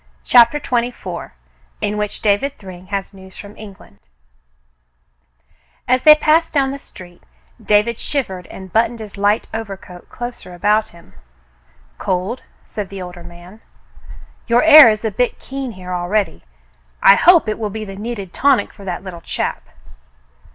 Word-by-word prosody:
CHAPTER 245 Hz, +4 st, +5 dB
XXIV 240 Hz, -, -3 dB, 0.5 s
IN 205 Hz, -, -2 dB
WHICH 210 Hz, -1 st, -4 dB
DAVID 215 Hz, +7 st, +1 dB
THRYNG 185 Hz, -2 st, -12 dB
HAS 195 Hz, 0 st, -4 dB
NEWS 190 Hz, -1 st, -14 dB
FROM 205 Hz, 0 st, -11 dB
ENGLAND 195 Hz, -, -14 dB, 1.9 s
As 255 Hz, 0 st, +2 dB
they 305 Hz, +2 st, +9 dB
passed 310 Hz, +2 st, +2 dB
down 275 Hz, -3 st, +1 dB
the 280 Hz, -, -6 dB
street, 175 Hz, -8 st, -14 dB, 0.4 s
David 210 Hz, +3 st, +2 dB
shivered 190 Hz, -, -4 dB
and 190 Hz, -1 st, -11 dB
buttoned 230 Hz, +1 st, +2 dB
his 215 Hz, -2 st, -9 dB
light 205 Hz, +2 st, +1 dB
overcoat 195 Hz, -5 st, -8 dB
closer 240 Hz, -7 st, -8 dB
about 210 Hz, +4 st, +1 dB
him. 170 Hz, 0 st, -19 dB, 0.9 s
"Cold 190 Hz, +7 st, -2 dB, 0.2 s
?" -, -, -35 dB
said 205 Hz, -3 st, -6 dB
the 195 Hz, -, -8 dB
older 180 Hz, -1 st, -10 dB
man. 175 Hz, +4 st, -14 dB, 0.9 s
"Your 235 Hz, +3 st, +3 dB
air 310 Hz, -5 st, +10 dB
is 215 Hz, +1 st, -2 dB
a 220 Hz, -, 0 dB
bit 245 Hz, +4 st, -1 dB
keen 270 Hz, -3 st, -6 dB
here 180 Hz, -1 st, -8 dB
already. 180 Hz, -, -2 dB, 0.6 s
I 195 Hz, -, +9 dB
hope 340 Hz, -, +5 dB
it 215 Hz, -, -2 dB
will 215 Hz, -2 st, -2 dB
be 215 Hz, +1 st, -6 dB
the 195 Hz, -1 st, -9 dB
needed 205 Hz, -3 st, -6 dB
tonic 270 Hz, -6 st, +2 dB
for 200 Hz, -, -14 dB
that 185 Hz, -1 st, -5 dB
little 180 Hz, -3 st, -9 dB
chap." -, -, -4 dB
210 Hz, 150 wpm, -18 LUFS, 185-240 Hz, 1.9 s, air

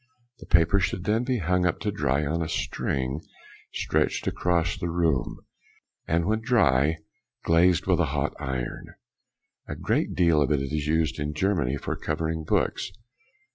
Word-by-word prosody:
The -, -, -12 dB
paper 85 Hz, +3 st, +4 dB
should 95 Hz, -1 st, -1 dB
then 110 Hz, +5 st, +1 dB
be 130 Hz, -1 st, 0 dB
hung 90 Hz, -1 st, +1 dB
up 90 Hz, -, -1 dB
to 105 Hz, -, -1 dB
dry 75 Hz, -6 st, 0 dB
on 80 Hz, +4 st, -1 dB
a 80 Hz, -, -2 dB
string 65 Hz, +2 st, -2 dB, 0.5 s
stretched -, -, 0 dB
across 85 Hz, 0 st, 0 dB
the 90 Hz, -3 st, -4 dB
room, 80 Hz, -6 st, 0 dB, 0.7 s
and 85 Hz, +1 st, +1 dB
when 110 Hz, +2 st, 0 dB
dry 80 Hz, -, +3 dB, 0.5 s
glazed 85 Hz, +1 st, +3 dB
with -, -, +2 dB
a -, -, +3 dB
hot -, -, -1 dB
iron. 65 Hz, -2 st, -5 dB, 0.7 s
A -, -, -5 dB
great -, -, -1 dB
deal 85 Hz, -4 st, +4 dB
of 70 Hz, 0 st, +1 dB
it 75 Hz, -, +3 dB
is 75 Hz, +2 st, -2 dB
used 80 Hz, 0 st, +1 dB
in 75 Hz, +1 st, -3 dB
Germany 75 Hz, -6 st, 0 dB
for -, -, -4 dB
covering 80 Hz, +1 st, -2 dB
books. 85 Hz, -, 0 dB
80 Hz, 160 wpm, -26 LUFS, 75-90 Hz, 0.7 s, paper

